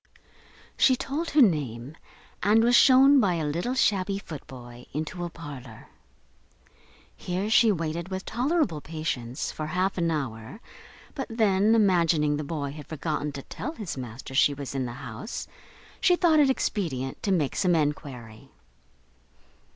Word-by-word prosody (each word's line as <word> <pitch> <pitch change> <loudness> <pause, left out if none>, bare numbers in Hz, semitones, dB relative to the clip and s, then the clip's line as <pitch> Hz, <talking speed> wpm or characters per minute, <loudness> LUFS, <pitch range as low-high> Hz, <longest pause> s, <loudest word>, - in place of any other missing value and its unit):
She 260 - +5
told 295 +6 -3
her 290 -2 +6
name, 140 - -1 0.5
and 215 +3 +4
was 240 +1 +4
shewn, 270 +2 +7
by 190 -7 +2
a 160 -2 -2
little 175 - -2
shabby 195 -5 +1
footboy, 125 -8 -10
into 155 +4 -4
a 175 - -3
parlour. 140 -8 -10 1.3
Here 185 +4 -3
she 230 -1 +6
waited, 165 -1 -3
with 190 0 -5
tolerable 245 - 0
patience, 140 -7 -4
for 155 - -5
half 185 +3 -1
an 170 -1 +1
hour, 135 - -4 0.5
but 270 - -4
then, 215 -1 +3
imagining 170 -8 +3
the 150 - -3
boy 145 -2 -4
had 150 0 -10
forgotten 150 -1 -3
to 135 - -7
tell 310 - -6
his 210 - -6
master 125 0 -8
she 140 +1 +3
was 140 -2 -6
in 130 -2 -2
the 120 - -6
house, 215 - -6 0.5
she 360 - +4
thought 335 -3 +3
it 285 -2 +5
expedient 155 - -2
to 200 - -1
make 155 -7 0
some 180 -3 +2
enquiry. 135 -7 -3
165 Hz, 150 wpm, -26 LUFS, 140-215 Hz, 1.3 s, shewn